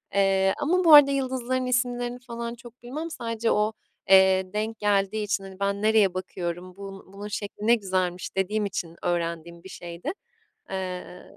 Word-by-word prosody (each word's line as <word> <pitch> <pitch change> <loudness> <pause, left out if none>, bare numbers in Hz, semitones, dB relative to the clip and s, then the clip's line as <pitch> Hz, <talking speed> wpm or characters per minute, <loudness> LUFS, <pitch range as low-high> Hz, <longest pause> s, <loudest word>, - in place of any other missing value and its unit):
Eee, 195 -1 +3
ama 360 +5 +1
bu 320 -2 +7
arada 285 -1 +10
yıldızların 255 -1 -1
isimlerini 245 -1 -1
falan 235 -1 -6
çok 240 +1 -15
bilmem. 305 +7 -5
Sadece 230 -4 -2
o, 210 +1 +1 0.4
eee, 190 0 +5
denk 220 +1 -3
geldiği 205 +1 +1
için, 200 -1 -1
hani, 190 0 -11
"Ben 200 0 -1
nereye 215 -4 +4
bakıyorum, 180 -1 -5
bun 195 -1 -10
bunun 205 +1 -7
şekli 210 0 -5
ne 235 - +7
güzelmiş." 185 -4 -2
dediğim 205 +2 0
için 175 -4 -4
öğrendiğim 170 0 -2
bir 190 - -11
şeydi. 175 - -6 0.6
Eee, 185 -1 -5
205 Hz, 160 wpm, -26 LUFS, 190-240 Hz, 0.6 s, arada